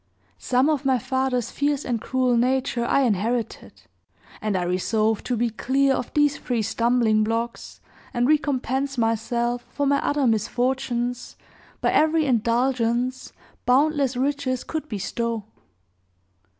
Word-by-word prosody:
Some 255 +2 +2
of 300 -2 +1
my 265 -2 +3
father's 255 -1 -1
fierce 285 0 -1
and 235 -3 -2
cruel 255 -1 +1
nature 250 0 +1
I 275 - +2
inherited; 230 0 -2 0.6
and 215 -3 0
I 180 - -1
resolved 215 +5 0
to 245 - 0
be 235 0 0
clear 270 +4 +1
of 250 - -3
these 295 -1 +3
three 240 -3 -1
stumbling 230 -1 +2
blocks, 230 +2 -3 0.3
and 240 +1 +1
recompense 275 -2 0
myself 235 +1 0
for 285 - -2
my 280 0 +3
other 290 -2 +1
misfortunes 245 +2 -1 0.5
by - - +2
every 315 0 +3
indulgence 245 0 0 0.4
boundless 275 0 +2
riches 270 -1 -1
could 310 -1 -5
bestow. 225 +1 -3
250 Hz, 125 wpm, -24 LUFS, 230-270 Hz, 0.6 s, my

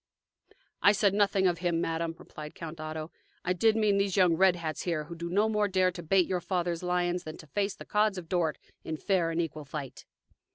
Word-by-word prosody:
"I 200 - +6
said 200 -1 +3
nothing 200 -1 +2
of 175 -2 +2
him, 175 -2 0
madam," 165 0 -2
replied 150 0 -10
Count 165 -1 -7
Otto. 155 +1 -5 0.3
"I 180 - +2
did 220 +4 +3
mean 210 -3 +3
these 200 -1 0
young 180 -3 +5
red 185 +2 +4
hats 160 -3 -4
here, 165 -4 -1
who 170 +3 -9
do 170 +1 -5
no 205 +5 +3
more 210 -1 +1
dare 185 -1 +2
to 175 - -8
bait 180 +2 +3
your 180 0 -1
father's 175 -1 -1
lions 180 0 0
than 155 -2 -7
to - - -12
face 200 +7 -1
the - - -11
Cods 210 -1 +2
of 175 -3 -7
Dort 165 -3 0 0.3
in 160 - -4
fair 180 -1 +1
and 165 0 -2
equal 160 -2 -3
fight." 140 -1 -7
175 Hz, 220 wpm, -29 LUFS, 165-195 Hz, 0.3 s, I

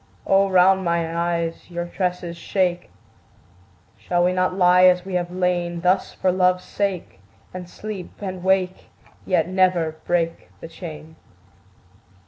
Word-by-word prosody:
O 195 0 +3
round 190 +1 +4
mine 170 -1 0
eyes 170 0 -2
your 175 0 -4
tresses 180 -1 -3
shake! 180 0 -1 1.1
Shall 175 -1 0
we 180 +1 +2
not 185 0 0
lie 180 0 +6
as 180 0 +4
we 190 - -6
have 175 -1 -1
lain 175 -1 -1
Thus 185 +2 +1
for 185 - 0
Love's 180 0 +2
sake, 195 - -3 0.3
And 180 -1 -8
sleep, 205 -2 -7
and 185 -3 -6
wake, 190 -1 0 0.4
yet 170 -4 +2
never 180 -4 +1
break 170 -1 -1
the - - -8
chain? 160 -1 -10
180 Hz, 135 wpm, -22 LUFS, 175-185 Hz, 1.1 s, lie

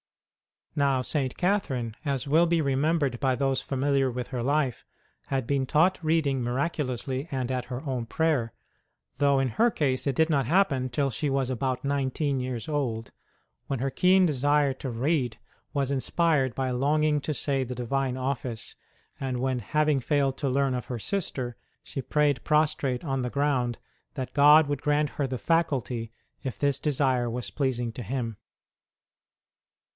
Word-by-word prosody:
Now, 140 -3 +2
St. 135 -2 -1
Catherine, 135 - 0
as 140 -2 -1
will 165 +4 +5
be 165 -1 +2
remembered 140 -2 +1
by 130 -2 +2
those 135 -1 0
familiar 135 0 +1
with 125 0 -5
her 125 -3 -3
life, 140 -1 0 0.4
had 135 -3 -1
been 135 +1 0
taught 175 +7 +3
reading 155 -5 +1
miraculously 130 +1 -2
and 130 -2 -2
at 125 -1 -2
her 125 0 -5
own 130 -5 -3
prayer, 145 -6 0 0.6
though 140 -1 +3
in 135 -1 +1
her 230 - +3
case 140 - 0
it 135 - +1
did 160 +3 +3
not 140 -4 +2
happen 140 -7 +2
till 135 +3 0
she 145 +5 -1
was 135 -1 0
about 130 0 -2
nineteen 140 0 0
years 125 -3 -4
old, 125 -7 -2 0.6
when 135 - -1
her 135 +2 0
keen 185 +4 +4
desire 145 -1 +2
to 130 - -5
read 125 0 0 0.4
was 140 -2 0
inspired 140 -2 +1
by 130 -1 -1
a - - -1
longing 150 +3 +2
to 155 - -2
say 135 -2 0
the 125 +1 -5
Divine 130 +2 -1
Office, 130 -3 -3 0.4
and 130 -2 -2
when, 130 0 0
having 150 +6 +1
failed 135 0 +1
to 140 - -1
learn 135 0 +1
of 125 -2 -3
her 125 - -4
sister, 130 - -2 0.3
she 135 - -5
prayed 145 -2 +1
prostrate 150 -4 +1
on 135 -4 -1
the 125 - -2
ground 130 -4 0 0.4
that 130 -2 -5
God 150 +1 +7
would 145 -1 -2
grant 150 0 +1
her 140 - -2
the 130 0 -3
faculty 130 -8 0 0.3
if 130 - -4
this 140 -1 +1
desire 130 -5 +1
was 120 +1 -4
pleasing 125 -5 -1
to 120 - -7
Him. 115 -1 -3
135 Hz, 165 wpm, -27 LUFS, 125-150 Hz, 0.6 s, God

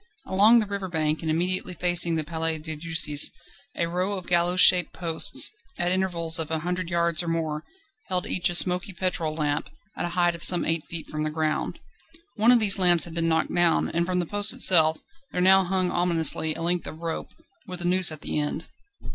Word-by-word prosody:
Along 210 +5 +4
the 225 - +1
river 200 -1 -5
bank, 155 -3 -2
and 160 - -4
immediately 180 +3 -2
facing 175 -1 +3
the 160 - -2
Palais 160 0 -3
de 155 0 -6
Justice, 155 -2 +1 0.5
a 170 - 0
row 180 +4 -3
of 185 - -9
gallows 175 +1 0
shaped 180 -2 +6
posts, 165 -3 +1 0.3
at 175 0 -1
intervals 170 -3 +1
of 160 -1 -3
a 160 - -2
hundred 180 +1 -4
yards 170 -1 +1
or 175 - -7
more, 160 -2 -3 0.4
held 180 -1 0
each 180 0 +1
a 175 - -3
smoky 180 +2 +1
petrol 170 -4 -3
lamp, 150 -1 -3 0.3
at - - -4
a 175 +1 -6
height 175 -1 +2
of 170 - -9
some 180 - +2
eight 165 -1 -1
feet 165 -2 -6
from 155 - -6
the 155 - -2
ground. 155 0 -3 0.6
One 225 +3 +4
of 245 - +5
these 200 -3 +1
lamps 175 -2 +5
had 170 - -4
been 165 0 -2
knocked 160 0 -1
down, 175 -1 +1
and 170 +1 -2
from 185 0 -2
the 175 - -1
post 205 +5 +1
itself 160 -10 +3 0.3
there - - -4
now 190 +1 +4
hung 185 0 -1
ominously 165 -3 +1
a 165 - -6
length 175 +1 -2
of - - -9
rope, 165 0 -6 0.4
with 180 -1 -7
a - - -4
noose 180 -1 +4
at 155 -2 -10
the - - -3
end. 150 +2 -4
170 Hz, 215 wpm, -24 LUFS, 160-180 Hz, 0.6 s, shaped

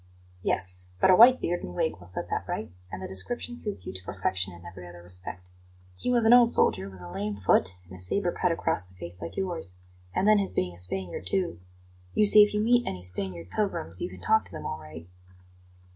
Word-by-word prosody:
"Yes; 90 0 +2
but - - +5
a - - +7
white 250 +5 +8
beard 175 +1 -2
and 90 - -7
wig 80 - -1
will 90 - -13
set 90 - -3
that - - -2
right, - - -4 0.2
and 95 - -6
the - - -4
description 240 - -2
suits 210 -4 -2
you - - -6
to 95 0 -8
perfection 95 0 -2
in 85 0 -14
every 90 0 -10
other 85 0 -13
respect. 90 0 -8 0.4
He 90 - -4
was 240 -2 +2
an 225 - +7
old 245 -1 +7
soldier, 95 - +2
with 95 -2 -13
a 90 0 -9
lame 100 +2 -4
foot 90 -1 +2
and 90 - -15
a 90 - -9
sabre 175 - 0
cut 180 0 0
across 165 - -1
the 90 +1 -19
face 90 0 -9
like 85 - -7
yours; 170 - -4 0.4
and 195 - +1
then 215 -1 +6
his 195 - -2
being 90 -1 -1
a 85 - -11
Spaniard, 90 0 -1
too 185 - 0 0.6
you 210 - +4
see, 210 +1 +9
if 210 - +5
you 210 - 0
meet 240 +2 +3
any 90 -1 -4
Spanish 90 -1 -4
pilgrims, 90 - -2
you - - -2
can 90 0 -12
talk 220 0 +3
to - - -8
them - - -8
all 80 - -4
right." 80 +2 -11
95 Hz, 235 wpm, -27 LUFS, -, 0.6 s, see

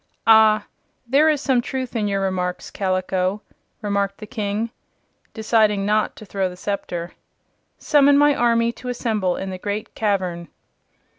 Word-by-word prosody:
"Ah, 220 -1 +6 0.4
there 280 +6 +4
is 300 -3 +1
some 265 -4 +2
truth 260 0 -5
in 215 -2 0
your 200 -1 -1
remarks, 180 -2 -2
Kaliko," 185 +1 -1 0.4
remarked 200 -1 -1
the 215 - -9
King, 215 0 -3 0.6
deciding 215 -3 +2
not 210 +1 +1
to 215 - -11
throw 190 -1 -2
the 180 - -11
scepter. 175 -3 -4 0.7
"Summon 285 -2 +4
my 290 0 +5
army 235 -2 +2
to 250 +1 -8
assemble 215 -7 -1
in 190 0 -5
the 185 - -6
Great 205 +2 -4
Cavern." 185 -5 -1
210 Hz, 145 wpm, -22 LUFS, 190-235 Hz, 0.7 s, Ah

